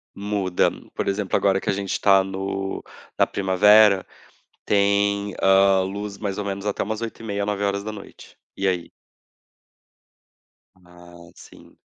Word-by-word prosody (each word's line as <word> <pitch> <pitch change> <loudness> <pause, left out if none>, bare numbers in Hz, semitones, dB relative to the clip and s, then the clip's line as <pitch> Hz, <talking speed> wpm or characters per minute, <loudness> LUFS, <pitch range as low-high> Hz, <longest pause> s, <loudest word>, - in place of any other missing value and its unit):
Muda. 100 -3 0 0.3
Por - - -3
exemplo, 100 0 -1
agora 95 -1 +2
que - - -4
a 100 - +2
gente 100 -1 -3
tá 95 -1 +5
no 95 0 -4 0.3
na - - +3
primavera, 100 +1 +4 0.6
tem, 100 0 +1
hã, 95 0 +5
luz, 100 +1 -5
mais 100 -2 -4
ou 105 - -3
menos 100 0 -4
até 105 - -1
umas 110 +2 -4
20h30, 110 -3 -4
21h. 100 0 -5 0.2
E 95 - -1
aí? 90 -2 -2 1.9
Ah, 90 -1 -16
sim. - - -17
100 Hz, 125 wpm, -23 LUFS, 95-100 Hz, 1.9 s, tá